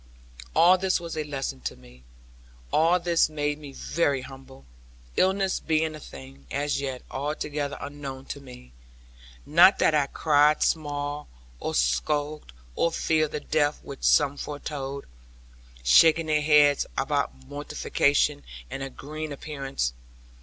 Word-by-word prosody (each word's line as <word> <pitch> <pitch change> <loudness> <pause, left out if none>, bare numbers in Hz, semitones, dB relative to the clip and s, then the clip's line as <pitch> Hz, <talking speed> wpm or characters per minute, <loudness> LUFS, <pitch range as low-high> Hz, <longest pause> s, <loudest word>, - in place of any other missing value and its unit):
All 180 +2 +6
this 190 0 +1
was 170 -1 -6
a 155 - -2
lesson 140 - -4
to - - -4
me. 60 0 -18 0.7
All 165 +3 +4
this 170 -2 +2
made 150 -1 -2
me 145 -2 -9
very 140 -1 0
humble; 130 - -12 0.5
illness 190 0 +2
being 160 0 0
a 155 - -8
thing, 70 - -12
as 145 0 -1
yet, 130 -2 -4
altogether 145 0 -3
unknown 140 -2 -7
to 140 - -12
me. 125 - -13 0.7
Not 175 +6 +6
that - - +3
I 145 -2 +2
cried 150 0 +3
small, 145 -1 -2 0.3
or - - -3
skulked, 145 - 0 0.2
or 170 - +1
feared 155 -2 0
the - - -2
death 145 0 0
which 140 - -9
some 145 -1 +4
foretold; 140 -2 -5 0.8
shaking 160 - +6
their 155 -1 +1
heads 145 -1 +4
about 65 - 0
mortification, 145 - 0 0.3
and 135 - -5
a 135 - -4
green 155 +3 -7
appearance. 135 - -3
145 Hz, 135 wpm, -26 LUFS, 135-155 Hz, 0.8 s, All